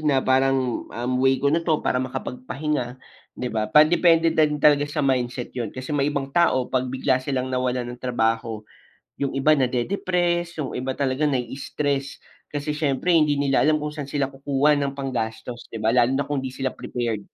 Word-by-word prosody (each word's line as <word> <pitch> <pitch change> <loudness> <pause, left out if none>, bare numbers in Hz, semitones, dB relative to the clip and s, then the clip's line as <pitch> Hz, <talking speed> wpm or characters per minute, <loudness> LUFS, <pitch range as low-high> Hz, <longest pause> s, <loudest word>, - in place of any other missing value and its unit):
na 145 -4 +1
parang, 130 -1 +1
um, 120 +2 -3
way 135 0 +4
ko 140 +1 +1
na 165 - +2
to 160 -2 0
para 125 - +1
makapagpahinga, 130 +1 -3 0.4
di 125 -2 -4
ba. 110 -1 -1
Pan 155 +5 +6
depende 165 -2 +4
na 155 -1 +4
talaga 145 0 +4
sa 145 -1 -1
mindset 125 -2 -1
yun, 120 -4 -3
kasi 130 +5 -7
may 140 -1 +1
ibang 140 -2 -3
tao 170 -7 +3
pag 130 -1 +1
bigla 130 0 +1
silang 130 -1 -2
nawalan 125 -1 0
ng 125 - -12
trabaho 115 -3 -1 0.5
yung 140 -1 -2
iba 135 +3 +2
na-de-depress 175 +5 0
yung 130 - -4
iba 130 +1 -3
talaga 140 +2 0
nai-stress 140 +1 -2 0.2
kasi 145 0 -4
siyempre 150 +2 0
hindi 155 -3 +4
nila 140 0 +2
alam 155 -1 +2
kung 150 - -2
saan 150 -2 -6
sila 140 -1 -1
kukuha 140 +2 +1
ng 140 -1 -2
panggastos, 120 -3 -4
di 110 -1 -7
ba? 110 - +3
Lalo 125 +2 +3
na 140 - +1
kung 145 0 -3
di 130 -1 -5
sila 135 -1 -2
prepared. 115 -6 -4
135 Hz, 185 wpm, -23 LUFS, 125-150 Hz, 0.5 s, Pan